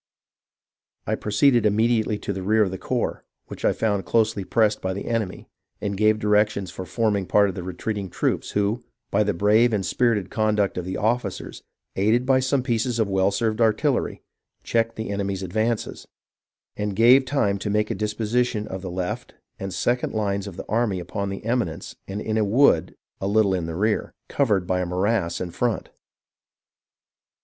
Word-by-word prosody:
I - - -1
proceeded 120 +3 +3
immediately 110 +1 +2
to 100 - -4
the 95 - -5
rear 110 +3 +3
of 95 - -2
the 95 - -5
corps, - - -2 0.2
which - - -10
I - - +4
found 100 -3 0
closely 110 +1 +1
pressed 105 +1 +1
by 95 - -2
the 100 - -5
enemy, 115 -5 -3 0.3
and 100 -1 -2
gave 110 +2 +3
directions 105 -3 +1
for 95 0 -7
forming 105 -5 0
part 100 -1 +4
of - - -4
the 90 - -5
retreating 95 +2 -4
troops, - - -1
who, 105 +4 0 0.3
by 100 - +3
the 105 -2 +1
brave 110 +6 +4
and 100 -3 0
spirited 105 0 +1
conduct 105 -2 +1
of 90 - -3
the 95 - -3
officers, 110 -2 -2 0.3
aided 110 +6 +2
by 130 0 +4
some 130 0 +1
pieces 120 -1 0
of 110 -2 +1
well 95 0 +3
served 110 +2 -1
artillery, 115 +5 +1 0.4
checked 115 0 0
the 110 -2 -4
enemy's 100 -1 -2
advances, 110 +5 -2 0.7
and 105 -1 -3
gave 120 +5 +6
time 125 -8 0
to 105 - -3
make 105 +1 +1
a - - +1
disposition 110 +1 -1
of 95 0 -6
the 95 - -5
left 90 0 -4 0.2
and 95 0 -4
second 120 +6 0
hues 100 -2 -1
of 95 -3 -9
the - - -6
army 110 -4 0
upon 100 +3 -4
an 95 - -5
eminence 115 -7 -2
and 100 +2 -4
in 110 0 0
a - - +3
wood 100 - +3 0.2
a 95 - -2
little 100 -1 +3
in 90 -3 -1
the 80 - -5
rear, 105 +4 0
covered 105 -10 +1
by 90 0 0
a - - -1
morass 95 0 0
in 90 -1 -4
front. 120 +4 -2
105 Hz, 180 wpm, -24 LUFS, 95-115 Hz, 0.7 s, gave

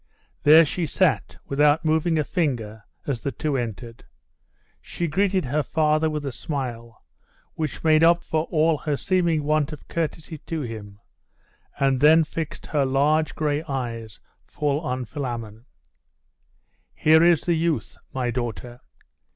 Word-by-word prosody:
There 160 +3 +7
she 165 +3 -2
sat, - - 0
without 145 +3 +2
moving 160 +1 +2
a 155 - +2
finger, 120 - -2 0.2
as 135 -5 -3
the 140 - -2
two 150 +3 -2
entered. 115 -1 -5 0.8
She 175 - -4
greeted 190 +2 +1
her 145 +5 0
father 155 +1 +1
with 150 -1 -4
a 135 - -2
smile, 120 -5 -6 0.5
which 155 -5 -4
made 155 0 +4
up 170 +1 +5
for 155 0 -1
all 160 -2 +1
her 150 -3 -2
seeming 170 -4 +1
want 155 0 +1
of 150 - -10
courtesy 160 -1 -4
to 160 +2 -5
him, 105 -5 -8 0.8
and 135 -2 +2
then 155 +3 +6
fixed 160 0 -6
her 145 -2 0
large 145 +4 +1
gray 150 -1 0
eyes 115 -6 -5 0.2
full 145 -1 -1
on 130 -5 -3
Philammon. 120 -4 -6 1.3
'Here 160 +1 +5
is 170 -2 +5
the 175 - 0
youth, 160 -7 -1 0.2
my 125 -2 -2
daughter. 120 0 -5
150 Hz, 145 wpm, -24 LUFS, 125-160 Hz, 1.3 s, There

